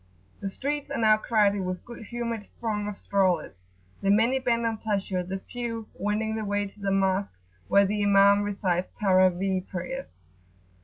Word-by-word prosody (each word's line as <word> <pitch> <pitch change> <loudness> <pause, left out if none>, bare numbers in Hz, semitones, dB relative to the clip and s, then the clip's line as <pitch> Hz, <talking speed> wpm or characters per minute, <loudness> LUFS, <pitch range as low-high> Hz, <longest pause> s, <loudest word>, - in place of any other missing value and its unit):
The 195 - -3
streets 285 +7 -3
are 280 - -3
now 215 -1 +5
crowded 205 -2 +2
with 185 0 -2
a - - -24
good 235 -2 -10
humoured 235 -3 -4
throng 210 -3 -2
of 205 -1 -5
strollers; 180 - 0 0.4
the 195 - 0
many 230 +6 +4
bent 235 -2 +1
on 225 -1 0
pleasure, 200 -4 -1
the 185 +2 -4
few 230 -2 -5
wending 210 +2 -1
their 220 - -2
way 205 0 0
to 200 +1 -12
Mosque, 195 - +1 0.3
where 200 - +5
the 205 +1 -1
Imam 200 0 +5
recites 190 -3 -1
"Tarawih" 185 -1 +2
prayers. 255 - -6
205 Hz, 165 wpm, -27 LUFS, 195-225 Hz, 0.4 s, now